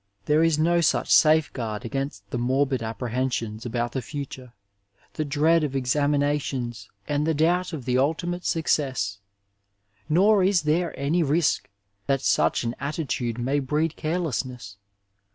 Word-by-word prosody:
There 150 +1 +3
is 165 -2 +3
no 170 +2 +3
such 160 - +2
safeguard 130 -9 +3
against 135 -5 -4
the 120 - -2
morbid 130 +1 +1
apprehensions 115 -1 -3
about 120 0 -2
the 130 - -3
future, 130 -2 -7 0.6
the 155 - -2
dread 155 +3 +2
of 140 -2 -2
ex 125 -2 +1
aminations 145 -4 -1 0.2
and 145 +1 0
the 160 - +1
doubt 175 +5 +1
of 145 -7 -6
the 125 0 +1
ultimate 175 +5 -1
success. 130 -11 0 0.9
Nor 195 +5 +4
is 185 -2 +3
tiiere 165 +3 +1
any 150 +6 +1
risk 155 +1 +1 0.4
that 135 -1 +1
suoh - - +2
an 115 0 -2
attitude 130 -5 -3
may 135 +4 0
breed 150 +4 -1
careless 160 -4 -1
ness. 120 -6 -10
145 Hz, 145 wpm, -25 LUFS, 125-160 Hz, 0.9 s, Nor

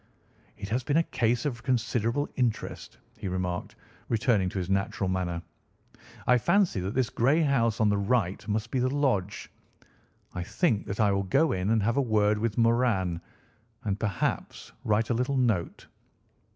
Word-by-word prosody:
"It 100 - -6
has 120 +4 0
been 145 +4 +1
a 165 - +4
case 120 +1 +1
of 120 -6 -2
considerable 120 +2 0
interest," 120 -4 -2 0.2
he - - -4
remarked, 90 -1 -3 0.3
returning 110 -5 +2
to 95 - -7
his 90 -2 -2
natural 95 0 0
manner. 90 -2 -2 0.8
"I 125 0 +4
fancy 175 - +2
that 95 +4 -4
this 130 -3 +1
grey 140 +8 +3
house 115 -6 +1
on 110 - +4
the 100 -1 +1
right 100 -2 0
must 110 +1 -2
be 130 - 0
the 130 +1 +2
lodge. 125 -9 -1 0.8
I 90 - -4
think 110 - 0
that 100 0 -4
I 105 -2 +4
will 100 0 +1
go 135 - +2
in 95 +1 -1
and 110 -2 +2
have 115 +4 +1
a - - +4
word 105 -4 +2
with 110 -2 -1
Moran, 115 -7 +2 0.6
and 100 -1 -2
perhaps 100 -7 -2
write 110 +2 +1
a - - +3
little 125 +4 0
note. 110 -9 0
110 Hz, 170 wpm, -28 LUFS, 100-125 Hz, 0.8 s, a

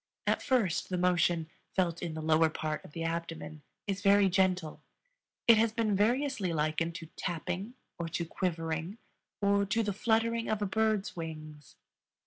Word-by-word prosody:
At - - +1
first 230 - +1
the 180 - -1
motion, 175 -2 +2 0.3
felt 170 -3 +1
in 170 -3 -4
the 160 - -5
lower 160 0 +4
part 155 0 -3
of - - -14
the 165 - -4
abdomen, 165 -2 -4 0.2
is 200 -1 -2
very 200 0 +5
gentle; 185 -3 +1 0.7
it 230 -2 +8
has 225 0 +3
been 220 -3 +1
variously 230 -1 +1
likened 160 +1 0
to 165 -3 -7
tapping, 180 +7 -3 0.2
or 165 -1 -3
to 170 +1 -2
quivering, 165 +2 -2 0.5
or 200 0 +4
to 225 +3 +1
the 205 -1 -1
fluttering 230 +2 +1
of 215 - 0
a 205 - 0
bird's 215 0 0
wings. 155 -3 -8
180 Hz, 160 wpm, -31 LUFS, 165-210 Hz, 0.7 s, it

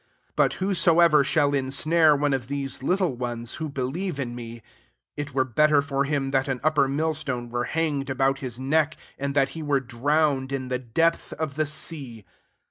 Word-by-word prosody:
6 - - -39
But - - +3
whosoever 170 -5 +4
shall 140 +1 +2
insnare 150 +4 +3
one 145 0 +1
of 125 -3 -2
these 140 -1 -3
little 180 0 0
ones, 120 -1 -3
who 155 - -2
believe 140 +5 -3
in 120 -3 -3
me, 115 -1 -9 0.5
it 145 -2 -6
were 130 - +3
better 150 +4 +3
for 140 -1 -1
him 140 -2 -1
that 135 +1 +1
an 135 -2 -2
upper 155 -3 +3
mill 155 +4 0
stone 125 -6 -3
were 120 0 -1
hang 155 -3 -1
ed 135 - -9
about 135 +1 +1
his 125 -2 -5
neck, 155 +3 +1 0.2
and 140 0 -3
that 135 -1 +3
he 165 - -7
were 145 -2 +1
drowned 135 +2 0
in 130 -2 -3
the 125 -1 -1
depth 165 +8 0
of 155 -3 -4
the 155 +1 -1
sea. 145 - -3
140 Hz, 195 wpm, -25 LUFS, 130-155 Hz, 0.5 s, whosoever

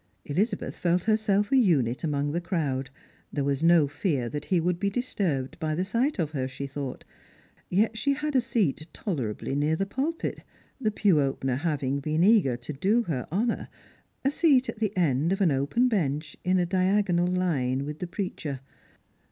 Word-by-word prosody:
Elizabeth 195 +11 -1
felt 175 0 +1
her 220 -1 +3
self 205 -2 +1
a - - +4
unit 145 - +3
among 145 -2 0
the 170 +3 -1
crowd. 140 -7 -2 0.4
There 145 - -1
was 140 0 0
no 165 -3 +5
fear 145 - -1
that 150 +2 -5
he 185 - +2
would 175 +1 0
be 200 - +1
disturbed 185 - -2
by 155 -2 -1
the 180 +3 -1
sight 240 +9 0
of 160 -5 -1
her, 130 -4 -2
she 135 +1 -6
thought; 140 -1 -6 0.6
yet 215 +4 +2
she 280 +5 +2
had 300 0 -3
a - - +6
ieat 220 - 0
tolerably 135 - -3
near 150 +3 +1
the 195 - -1
pulpit 280 - -3 0.2
— - - -33
the 220 - +2
pew 200 -7 +3
opener 135 -2 -1
having 140 -3 -1
been 155 +3 0
eager 185 - +4
to 125 +5 -7
do 205 - +2
her 140 - -3
honour 225 +7 0 0.3
— - - -39
a 275 - +4
seat 285 -5 +4
at - - -6
the 210 -3 -1
end 155 -1 +2
of 195 - 0
an 185 -6 +3
open 140 - +2
bench 155 - -1
in 185 +1 +2
a 180 - +2
diagonal 185 -1 +2
fine 140 -7 0
with 150 +1 -6
the 180 - -3
preacher. 170 -7 -4
170 Hz, 195 wpm, -27 LUFS, 140-205 Hz, 0.6 s, a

